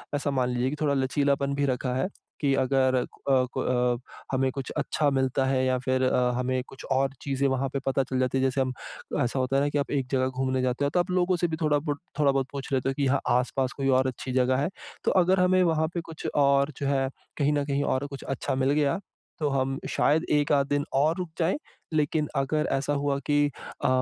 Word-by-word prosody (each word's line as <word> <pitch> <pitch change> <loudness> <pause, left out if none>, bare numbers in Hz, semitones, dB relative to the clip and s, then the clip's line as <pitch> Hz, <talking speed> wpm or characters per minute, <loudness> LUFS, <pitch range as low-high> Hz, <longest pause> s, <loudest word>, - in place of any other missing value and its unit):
ऐसा 145 0 -1
मान 130 -2 +1
लीजिए 125 +1 0
कि 145 - -3
थोड़ा 145 -2 +2
लचीलापन 140 +1 +1
भी 145 - +1
रखा 125 -1 -1
है, 130 - 0 0.3
कि 140 -2 +2
अगर 130 0 +2
अ 130 +2 -1 0.3
अ, 125 -1 +1 0.3
हमें 130 0 +2
कुछ 135 -1 -5
अच्छा 150 -2 +1
मिलता 130 -1 +1
है 130 -1 +1
या 130 0 +2
फिर 130 0 0
अ, 125 -1 +2
हमें 130 0 0
कुछ 135 - -12
और 135 +1 +2
चीज़ें 140 0 0
वहाँ 135 0 0
पे 140 - 0
पता 135 0 +2
चल 130 0 -2
जाती 130 +1 +1
है 130 - +1
जैसे 135 0 +1
हम 130 -1 -1 0.5
ऐसा 125 +2 -1
होता 130 +1 0
है 140 - +4
ना 145 - +1
कि 145 - -1
आप 140 - -1
एक 135 -3 0
जगह 130 -1 +2
घूमने 130 0 -1
जाते 125 +2 0
हो - - +2
तो 175 +4 +1
आप 180 +1 0
लोगों 180 0 +2
से 175 - +1
भी 160 - -3
थोड़ा 150 -1 +3
बुट 145 -1 -3 0.2
थोड़ा-बहुत 135 -2 +2
पूछ 140 -1 -6
लेते 135 0 +1
हो 135 - 0
कि 140 - 0
यहाँ 135 +1 +2 0.2
आस-पास 130 +1 -1
कोई 135 -1 -1
और 130 0 +3
अच्छी 130 0 -5
जगह 130 0 +3
है? 145 +5 0 0.3
तो - - +2
अगर 185 0 +3
हमें 185 0 +4
वहाँ 160 -2 +2
पे 170 - -2
कुछ 165 -1 -7
और 140 0 +3
जो 140 - -2
है 135 -1 +1 0.3
कहीं 145 0 +2
न 145 -1 0
कहीं 140 0 0
और 135 +1 0
कुछ 140 -1 -8
अच्छा 135 -1 -2
मिल 135 +1 +2
गया, 145 +3 +2 0.4
तो 150 - +1
हम 135 0 0
शायद 160 +3 +2
1 150 0 +2
आध 140 -1 +3
दिन 145 0 +1
और 150 +4 +3
रुक 180 -2 -4
जाएँ। 170 +7 +2 0.4
लेकिन 150 0 +1
अगर 145 +3 0
ऐसा 140 +2 0
हुआ 140 -1 0
कि 145 0 +4 0.4
अ, - - +5
135 Hz, 235 wpm, -27 LUFS, 130-145 Hz, 0.5 s, अ